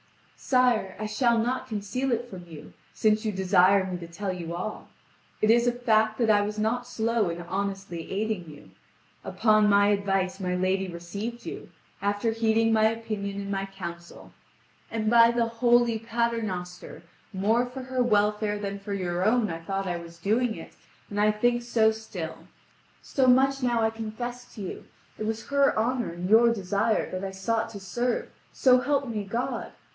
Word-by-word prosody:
"Sire, 245 -7 +2
I 215 - -3
shall 235 +2 +2
not 250 +3 -1
conceal 225 +4 -2
it 240 +1 -1
from 185 -6 -10
you, 160 -3 -11 0.2
since 215 0 +2
you 215 - 0
desire 190 0 +4
me 180 -1 -4
to 170 - -8
tell 185 +3 -4
you 170 -2 -5
all. 185 +5 -5 0.5
It 215 - +5
is 235 +1 +4
a - - +4
fact 220 -3 +2
that 230 -3 +1
I 205 -1 +4
was 210 +1 -3
not 235 +3 -1
slow 230 -4 0
in 170 0 -4
honestly 195 -2 -4
aiding 200 -4 -2
you. 145 -1 -14 0.5
Upon 215 -2 +3
my 200 0 +5
advice 195 -2 0
my 180 -1 -1
lady 185 +1 0
received 200 +7 -6
you, - - -7 0.3
after 205 +3 0
heeding 225 0 +2
my 220 0 +4
opinion 215 -3 -2
and 200 0 -5
my 195 0 -2
counsel. 170 -3 -9 0.6
And 220 -1 -1
by 230 0 +7
the 235 0 +1
Holy 235 0 +2
Paternoster, 220 -8 -3 0.3
more 220 +6 +1
for 255 +1 -7
her 255 0 -1
welfare 210 -2 +2
than 200 -1 -4
for 200 +1 -5
your 180 -2 -2
own 215 -1 +2
I 165 - -5
thought 195 +3 -3
I 175 -1 -1
was 170 0 -11
doing 220 +6 +1
it, - - -10 0.4
and 205 0 0
I 210 0 +4
think 240 +3 +1
so 230 -2 +3
still. 195 -7 -7 0.6
So 265 -2 +1
much 270 +2 +4
now 240 -2 +1
I 220 - +2
confess 240 +2 -6
to 215 - -7
you: 185 - -7 0.3
it 215 - -2
was 220 0 -4
her 280 -3 +3
honour 240 -1 0
and 175 +1 -5
your 230 +3 +6
desire 205 +1 0
that 185 +1 -4
I 195 - -3
sought 220 +4 -1
to 210 -3 -8
serve, 240 +6 -2 0.2
so 255 -1 +4
help 280 0 0
me 215 -3 -3
God! 240 +5 -3
215 Hz, 180 wpm, -27 LUFS, 195-235 Hz, 0.6 s, by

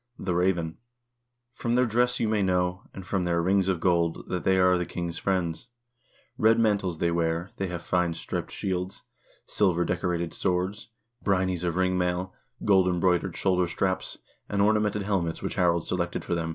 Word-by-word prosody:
The 90 - -2
raven: 85 -2 0 0.7
From 120 -1 -2
their 125 +1 +4
dress 125 +2 +1
you 115 - +1
may 105 -1 +1
know, 90 -1 +1
and 95 - -9
from 95 -1 -1
their 85 -1 +1
rings 95 +2 +2
of 95 -3 +1
gold, 85 -2 +1
that 90 - -2
they 95 0 +3
are 90 0 +5
the 90 0 -1
king's 85 -1 -4
friends; 90 0 -1 0.7
red 110 +1 +5
mantles 100 -6 +1
they 85 +1 +1
wear, 85 +1 -1
they 95 - -1
have 90 -1 -5
fine 90 -2 0
striped - - -4
shields, 95 -1 -3 0.4
silver 90 -4 +1
decorated 85 -2 -1
swords, 95 +3 -1 0.3
brynies 95 -3 +1
of 85 -1 -1
ring 95 0 +1
mail, 90 +1 -1 0.3
gold 95 -3 +5
embroidered 90 0 +1
shoulder 90 -2 +2
straps,2 95 +2 -2 0.3
and 100 0 +1
ornamented 105 -1 +2
helmets 95 -5 -1
which - - -2
Harald 85 -2 +2
selected 85 -1 -2
for - - -2
them. 85 -1 -1
90 Hz, 175 wpm, -27 LUFS, 85-95 Hz, 0.7 s, are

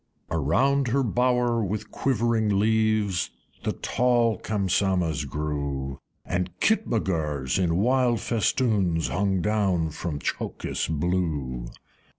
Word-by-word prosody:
Around 125 - +2
her 135 +3 +2
bower, 125 0 +1
with 105 +2 -4
quivering 115 -5 +1
leaves, 110 -3 +2 0.3
The - - -1
tall 120 -4 +1
Kamsamahs 95 -6 0
grew, 70 -2 -3 0.3
And 90 +1 -1
Kitmutgars 85 - 0
in 85 -2 +1
wild 120 +2 +2
festoons 100 - +1
Hung 95 -1 0
down 95 -6 +1
from 75 0 -4
Tchokis - - -3
blue. 75 -7 -1
95 Hz, 100 wpm, -26 LUFS, 80-115 Hz, 0.3 s, Around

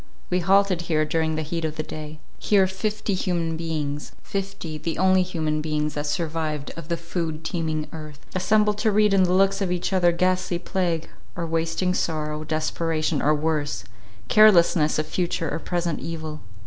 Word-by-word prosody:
We 180 - +3
halted 190 0 +3
here 155 -1 +2
during 160 0 0
the 155 - -2
heat 165 +2 -3
of 155 -1 -2
the 155 - -2
day. 155 0 -8 0.2
Here 200 -2 +4
fifty 210 +2 -2
human 175 -3 -1
beings—fifty, 160 +3 -4
the 160 +1 -3
only 185 +1 +4
human 160 -4 -1
beings 150 -1 -1
that 145 0 -3
survived 155 -3 -2
of 165 -2 -8
the 170 0 -1
food 165 -2 -4
teeming 160 -3 -2
earth, 155 -2 -9
assembled 210 +3 +2
to 220 +1 +2
read 210 0 +4
in 190 -1 +5
the 180 - +1
looks 195 +1 +3
of 190 -2 0
each 180 +2 -1
other 175 -2 +4
ghastly 180 0 +1
plague, 175 -3 -1 0.3
or 170 - -2
wasting 165 +3 0
sorrow, 155 -3 -2
desperation, 155 0 -1
or 150 +1 +3
worse, 150 - -1 0.4
carelessness 170 - +5
of 155 - 0
future 170 -2 -1
or - - -2
present 170 -2 -2
evil. 155 -2 -5
165 Hz, 170 wpm, -24 LUFS, 155-185 Hz, 0.4 s, in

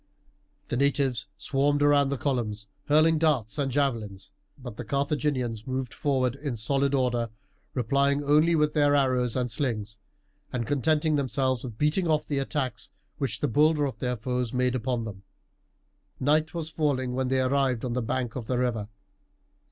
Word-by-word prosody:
The 120 - -1
natives 135 -4 +1
swarmed 145 +1 +1
around 145 -1 +4
the 140 - -1
columns, 115 -7 -2 0.2
hurling 155 +2 +4
darts 150 -6 +1
and 135 -2 0
javelins; 115 -8 -2 0.3
but 125 -5 -8
the 120 - -6
Carthaginians 140 -4 -1
moved 130 -1 -3
forward 130 -4 0
in 140 -3 -4
solid 135 +5 +1
order, 120 -3 0 0.5
replying 140 +4 +1
only 155 +4 +4
with 150 -1 +2
their 145 -2 +3
arrows 130 -4 +2
and 125 -2 -1
slings, 110 -5 -2 0.5
and 120 -2 -2
contenting 150 +3 +1
themselves 130 -2 0
with 120 -5 -7
beating 150 +6 +1
off 155 -1 +1
the 140 -2 -1
attacks 135 -3 -2 0.3
which 120 -6 -2
the 150 - +2
bolder 150 +3 +3
of 135 - -5
their 125 -1 -1
foes 125 +1 -2
made 125 0 +1
upon 125 -1 -1
them. 100 -3 -8 1.0
Night 155 +4 +2
was 160 -1 -4
falling 135 -5 0
when 130 0 -1
they 130 +1 +1
arrived 130 -2 +1
on 120 - -2
the 125 - 0
bank 120 0 -2
of 120 -4 -5
the 125 - 0
river. 115 -4 -1
130 Hz, 165 wpm, -27 LUFS, 120-145 Hz, 1.0 s, around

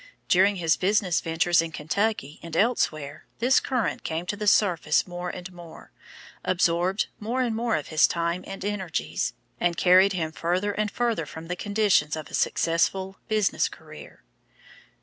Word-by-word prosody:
During 195 +3 +4
his 165 -3 +1
business 190 -2 +1
ventures 165 +1 +2
in 165 -1 -5
Kentucky 160 -1 -2
and 165 -1 -6
elsewhere 155 -10 0
this 255 +3 +4
current 250 -4 -2
came 165 +2 -3
to 190 - -3
the 210 0 -4
surface 175 -7 +3
more 175 0 -5
and 180 +1 -8
more, 170 -2 -13 0.5
absorbed 180 +2 +1
more 235 +5 -2
and 235 -3 -1
more 230 0 0
of 150 - -4
his 155 -1 +5
time 170 +1 -2
and 195 0 -7
energies, 175 - -2 0.3
and 175 -1 0
carried 185 +2 +5
him 160 -4 -2
further 180 +6 -1
and 210 +1 -1
further 230 -9 -1
from 160 +2 -9
the 180 - -1
conditions 200 -7 +1
of 155 -1 -8
a - - -15
successful 190 +3 0
business 215 -2 +1
career. - - -13
180 Hz, 160 wpm, -25 LUFS, 165-205 Hz, 0.5 s, his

